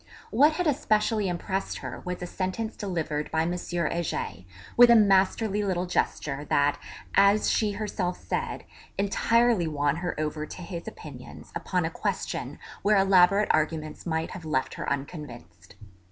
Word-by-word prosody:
What 290 +7 +5
had 360 +3 -1
especially 220 -7 +1
impressed 185 +2 -2
her - - -7
was 180 0 -4
a - - -2
sentence 190 +5 -3
delivered 160 -6 -3
by 160 0 +1
M. 170 - -1
Heger, 170 - -2 0.4
with 245 0 +8
a 235 - +8
masterly 205 0 +3
little 185 -2 0
gesture, 145 -5 -1
that, 145 0 +2 0.3
as 200 +2 +4
she 210 -2 +1
herself 200 -4 -2
said, - - -3 0.3
entirely 225 0 +2
won 145 -1 0
her 175 -2 -3
over 155 0 -2
to 180 - -9
his 170 -1 -7
opinions - - -10
upon - - -1
a - - -2
question - - -3 0.2
where 210 0 +4
elaborate 195 +1 +5
arguments 155 +1 -1
might 160 0 -1
have 185 - -8
left 155 -4 -1
her - - -4
unconvinced. 140 -3 -7
180 Hz, 150 wpm, -27 LUFS, 160-210 Hz, 0.4 s, with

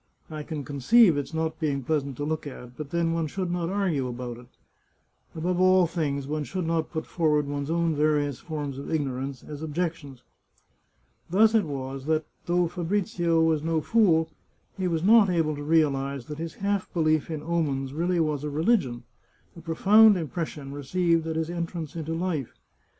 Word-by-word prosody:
I 155 -1 -5
can 150 -1 -5
conceive 160 - +5
its 145 +1 -3
not 160 0 -2
being 140 -4 -1
pleasant 140 -2 -1
to 145 - -3
look 155 0 -2
at. 125 -3 -10
But 150 0 -7
then 170 0 0
one 165 -1 -1
should 185 +2 -3
not 175 -1 -1
argue 180 -9 0
about 120 -1 -5
it. 120 0 -14 0.9
Above 175 +3 -1
all 185 -1 +5
things, 145 -5 -2
one 150 +2 -2
should 185 +3 -4
not 165 -1 0
put 160 -1 -4
forward 150 -3 +1
one's 140 0 -4
own 165 -1 +1
various 145 -2 +1
forms 145 -4 -5
of 140 - -7
ignorance 135 -3 -2
as 150 -1 -8
objections. 155 -5 -4 1.1
Thus 215 +5 +4
it 220 -4 +3
was 135 -2 -5
that, 155 -1 +1 0.2
though 175 0 +2
Fabrizio 175 -1 0
was 160 -2 +2
no 165 0 0
fool, 165 -4 +3 0.4
he 190 -2 -1
was 165 -2 -1
not 215 0 +6
able 165 -4 +1
to 145 - -7
realize 140 -4 +1
that 150 +2 -7
his 165 -1 -5
half 200 -1 -2
belief 155 -2 +2
in 155 -2 -4
omens 145 -5 -1
really 175 +3 0
was 150 -3 0
a 150 - -2
religion, 145 - +1 0.5
a 170 - -11
profound 200 +6 +5
impression 155 -4 -5
received 165 +3 0
at 160 - -2
his 160 +1 -2
entrance 170 -2 -4
into 165 0 -3
life. 165 -7 -2
160 Hz, 175 wpm, -26 LUFS, 145-170 Hz, 1.1 s, not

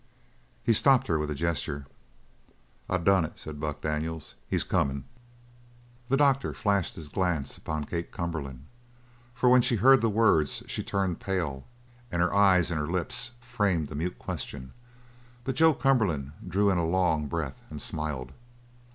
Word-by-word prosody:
He 115 - +4
stopped 135 +3 +5
her 80 -2 +1
with 75 0 -2
a 75 - -2
gesture. 70 -3 -2 1.0
"I 95 - +2
done 95 +1 +3
it!" 80 - -6
said 75 -2 -8
Buck 75 -1 -4
Daniels. 80 +1 -3
"He's - - 0
comin'!" 70 -1 0 1.1
The 135 - +3
doctor 140 -2 +2
flashed 100 -3 0
his 80 - -8
glance 85 -4 -1
upon 75 -1 -4
Kate 85 +3 -4
Cumberland, 75 -7 -5 0.7
for 125 - +1
when 125 0 +7
she 120 - +1
heard 130 +5 +6
the 115 - +2
words 105 -9 +2
she - - -3
turned 95 -3 -1
pale 85 -9 -3 0.4
and 85 - -1
her 90 +1 +2
eyes 95 -4 +4
and 80 - -1
her 75 - -2
lips 120 +8 0
framed 100 - 0
a - - -5
mute 85 +4 -3
question; 65 -2 -6 0.7
but 130 +2 -2
Joe 160 -2 +5
Cumberland 100 - +1 0.2
drew 100 +3 +2
in 90 - +1
a - - +1
long 80 -3 +1
breath 75 -4 -4
and - - -7
smiled. 70 -5 -4
85 Hz, 160 wpm, -28 LUFS, 75-100 Hz, 1.1 s, when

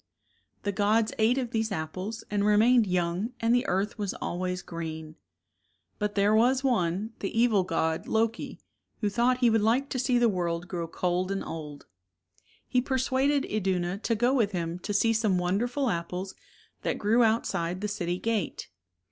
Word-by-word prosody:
The 205 - 0
gods 215 +3 +2
ate 225 +4 +3
of 250 -3 -2
these 220 -1 -1
apples, 190 +6 -4
and 205 -1 +1
remained 215 +2 +4
young 180 +5 -1
and 230 +1 +2
the 245 +2 +2
earth 195 +4 -1
was 205 -2 -2
always 180 +1 -3
green. 160 -2 -6 0.8
But 210 0 -2
there 205 +1 +3
was 250 +4 +3
one, 210 -3 0
the 195 - -2
evil 225 -5 +4
god, 160 -3 -1
Loki, 225 +1 -1 0.4
who 205 -2 0
thought 245 +4 +2
he 240 - +5
would 225 -1 +3
like 245 +6 +2
to 255 - -2
see 250 0 +2
the 240 0 +4
world 175 -3 -1
grow 170 -3 -4
cold 180 +2 -1
and 195 0 -2
old. 150 -3 -7 0.8
He 250 - +2
persuaded 265 +2 +1
Iduna 190 -2 -1
to 230 +1 0
go 240 +4 +2
with 220 -6 +1
him 170 -1 -3
to 200 - -5
see 225 +3 +3
some 215 -4 +2
wonderful 235 +10 0
apples 180 0 -3 0.5
that - - -1
grew 225 +4 +3
outside 185 -5 0
the 210 - -1
city 180 -4 -2
gate. 220 -3 -2
205 Hz, 170 wpm, -28 LUFS, 180-230 Hz, 0.8 s, he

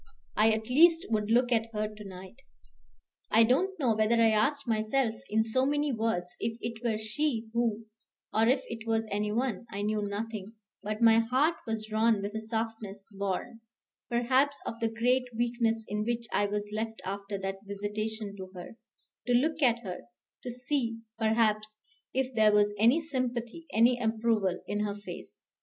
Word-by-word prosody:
I 215 +1 +5
at 220 0 0
least 330 +6 +5
would 210 -1 0
look 245 +2 +3
at 225 -1 +2
her 215 0 -1
to 210 0 -10
night. 190 +1 -10 0.9
I 225 +1 +6
don't 365 +12 +2
know 245 -6 +2
whether 215 +2 +3
I 230 -1 +5
asked 275 +6 +1
myself, 220 +2 +1 0.2
in 220 +1 +3
so 230 +4 +1
many 290 +1 +1
words, 220 -7 -1
if 225 0 -2
it 230 0 -5
were 225 -3 +1
she 225 +1 -2
who 230 -2 0 0.5
or 220 +1 +3
if 260 +2 +3
it 230 0 -7
was 225 0 +1
any 210 +1 0
one 235 -1 -1
I 200 +1 -4
knew 210 0 0
nothing; 210 0 -4 0.3
but 215 +3 -3
my 225 0 +7
heart 260 +8 +2
was 225 -1 -2
drawn 220 -1 +2
with 205 +1 -4
a 220 - -3
softness 220 -3 -4
born, 200 +4 -3 0.5
perhaps, 260 +4 +2
of 230 - -5
the 230 - +1
great 245 +3 +2
weakness 230 -2 0
in 210 +1 -1
which 235 +1 -2
I 205 - +2
was 205 0 -3
left 220 +1 -3
after 200 +1 -4
that 195 0 -4
visitation 210 +1 -3
to 190 -1 -7
her, 180 +5 -9 0.5
to 245 - +3
look 310 +6 +2
at 240 -3 +3
her, 185 -3 -6 0.4
to 250 - -6
see, 245 -1 -1 0.2
perhaps, 215 -1 +1 0.4
if 260 0 -1
there 215 -2 +5
was 205 0 +3
any 240 +9 +5
sympathy, 255 0 -3
any 240 +3 +4
approval 220 -5 +1
in 205 - -2
her 210 -1 -1
face. 205 0 -9
225 Hz, 175 wpm, -30 LUFS, 210-240 Hz, 0.9 s, my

